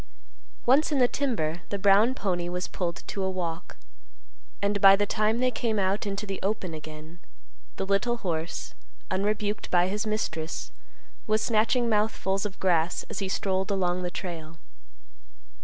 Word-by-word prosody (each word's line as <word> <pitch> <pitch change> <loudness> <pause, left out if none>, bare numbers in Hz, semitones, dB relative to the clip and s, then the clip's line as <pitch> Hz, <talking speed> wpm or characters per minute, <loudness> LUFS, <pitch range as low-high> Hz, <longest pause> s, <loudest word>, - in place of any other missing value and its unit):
Once 280 +6 +4
in 290 - +2
the 250 -2 +5
timber, 175 - -1
the 200 - -2
brown 205 +6 +5
pony 175 -5 -1
was 180 +1 -2
pulled 175 -3 -3
to 195 - -4
a 190 - +1
walk, 175 - -4 0.8
and 200 0 0
by 195 0 +9
the 205 +1 +1
time 215 +2 +1
they 255 +1 +2
came 220 -2 -1
out 195 +1 0
into 200 +1 -3
the 195 -2 -4
open 195 -4 -1
again, 155 +2 -9 0.6
the 195 - -2
little 200 +5 +1
horse, 160 - -3 0.4
unrebuked 210 +2 -1
by 180 0 +4
his 210 +3 -2
mistress, 160 - -3 0.6
was 215 0 +2
snatching 230 +2 +2
mouthfuls 210 -2 +1
of 195 - -13
grass 175 -2 +1
as - - -3
he 195 -2 -2
strolled 190 +1 0
along 185 -2 0
the 180 - -2
trail. 165 -3 -6
195 Hz, 155 wpm, -27 LUFS, 175-215 Hz, 0.8 s, by